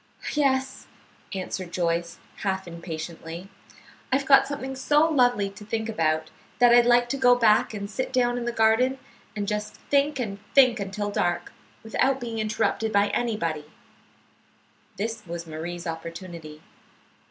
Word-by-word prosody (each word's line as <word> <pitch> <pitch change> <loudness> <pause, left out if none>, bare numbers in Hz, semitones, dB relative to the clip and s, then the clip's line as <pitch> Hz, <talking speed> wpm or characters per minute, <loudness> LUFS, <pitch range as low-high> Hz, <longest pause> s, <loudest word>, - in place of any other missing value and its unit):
"Yes," 265 -3 0 0.4
answered 185 -1 -4
Joyce, 170 -1 -1 0.2
half 190 -2 -2
impatiently; 170 +1 -7 0.6
"I've 270 +1 +2
got 270 0 +6
something 270 -2 -5
so 295 +4 +3
lovely 245 -9 +3
to 200 +1 -12
think 220 +1 -3
about, 155 -5 0 0.3
that 245 -1 +6
I'd 240 0 +6
like 240 0 +5
to 275 - -1
go 250 -2 +5
back 220 -2 +3
and 200 -1 -4
sit 255 +5 -4
down 245 -2 +2
in 240 - -4
the 240 - 0
garden 235 +4 +3 0.4
and 205 -1 -3
just 210 0 -3 0.2
think 285 0 +2
and 205 -5 -3 0.2
think 255 -4 +6
until 205 +1 -3
dark, 175 -3 -1 0.3
without 260 +4 +1
being 230 -3 -4
interrupted 215 +1 0
by 200 0 +3
anybody." 170 -10 -1 1.3
This 225 +2 -3
was 170 0 -5
Marie's 170 +2 -6
opportunity. 165 -1 -7
215 Hz, 140 wpm, -25 LUFS, 175-245 Hz, 1.3 s, got